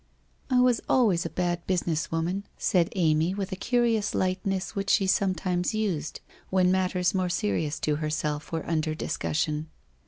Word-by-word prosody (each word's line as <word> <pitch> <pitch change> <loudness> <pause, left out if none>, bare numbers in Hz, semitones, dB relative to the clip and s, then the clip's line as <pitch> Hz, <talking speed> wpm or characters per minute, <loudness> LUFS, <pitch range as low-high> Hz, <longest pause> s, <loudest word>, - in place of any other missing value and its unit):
' - - -39
I 255 -1 +4
was 250 -2 +3
always 205 -10 +3
a - - -8
bad 175 -1 -2
business 170 -4 0
woman,' 175 +5 -1
said 175 -1 +2
Amy 165 0 +2
with 200 0 -3
a - - -2
curious 230 0 +1
lightness 185 0 -1
which 200 0 -2
she 195 - +4
sometimes 185 -1 0
used 185 -9 -2 0.3
when 185 -1 +3
mat 185 -1 +2
ters 180 +1 +1
more 185 -2 0
serious 150 - -1
to 150 -1 +1
herself 150 -1 -2
were 165 -1 -3
under 155 -1 0
discussion. 155 0 -2
180 Hz, 165 wpm, -27 LUFS, 160-195 Hz, 0.3 s, I